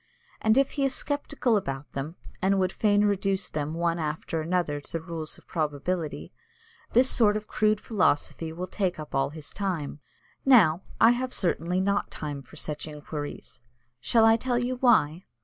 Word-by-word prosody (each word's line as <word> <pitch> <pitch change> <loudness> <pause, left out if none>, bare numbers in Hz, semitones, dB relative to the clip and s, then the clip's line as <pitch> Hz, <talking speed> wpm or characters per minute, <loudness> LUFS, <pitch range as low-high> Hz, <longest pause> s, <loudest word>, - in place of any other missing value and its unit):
And 220 +2 +3
if 275 0 +3
he 280 - -1
is 270 -1 +2
sceptical 285 -4 0
about 140 -8 -3
them, 145 +5 -5 0.3
and 195 +1 +3
would 185 -1 +1
fain 205 0 +3
reduce 195 -1 0
them 150 +1 -3
one 170 0 0
after 155 +1 -2
another 160 -3 -1
to - - -9
the 165 - 0
rules 160 -1 -5
of - - -20
probability, 155 +1 -3 0.6
this 250 +3 +5
sort 215 -5 +3
of 215 - -6
crude 215 -1 +2
philosophy 170 -6 0
will 175 +3 -4
take 185 -1 -2
up 155 - -8
all 135 0 +1
his 150 0 -8
time. 175 -8 -3 0.4
Now, 190 - +6 0.2
I 225 - +7
have 255 +1 -1
certainly 175 0 0
not 200 +2 +1
time 145 -2 -5
for 135 - -16
such 150 0 -4
inquiries. 150 -3 -7 0.4
Shall 225 - +4
I 225 0 +6
tell 245 +1 -1
you 245 +1 -1
why? 190 - +3
180 Hz, 175 wpm, -27 LUFS, 155-215 Hz, 0.6 s, I